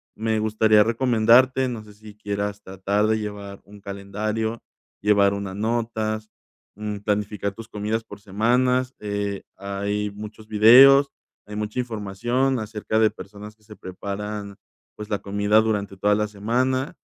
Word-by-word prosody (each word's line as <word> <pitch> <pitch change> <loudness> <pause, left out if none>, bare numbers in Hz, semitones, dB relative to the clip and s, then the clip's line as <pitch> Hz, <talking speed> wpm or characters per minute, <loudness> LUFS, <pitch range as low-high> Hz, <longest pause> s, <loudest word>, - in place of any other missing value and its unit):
Me 110 0 -1
gustaría 110 0 +4
recomendarte, 125 +2 +3
no 115 -3 -6
sé, 105 -1 -15
si 105 0 -14
quieras 100 -1 -4
tratar 95 +2 -1
de 110 0 +1
llevar 100 -2 -7
un 100 0 -15
calendario, 105 +3 -4 0.4
llevar 100 -1 +4
unas 100 -1 -5
notas, 110 0 -2 0.5
mm, 105 -1 -5
planificar 105 0 -2
tus 115 +2 -10
comidas 110 +1 -2
por 105 -2 -12
semanas, 125 +5 +1
eh, 100 -1 -3
hay 100 +1 -3
muchos 105 +1 -10
videos, 130 +6 +7 0.4
hay 105 - -8
mucha 105 +3 -3
información 120 +3 -1
acerca 110 0 -3
de 110 -1 +4
personas 105 +1 -11
que 110 - -37
se 105 0 -13
preparan, 100 +2 -6 0.4
pues, 105 - -8
la 105 - -1
comida 100 +2 +2
durante 100 -3 -2
toda 105 +2 +2
la 105 0 0
semana. 125 +6 -1
105 Hz, 145 wpm, -23 LUFS, 100-110 Hz, 0.5 s, videos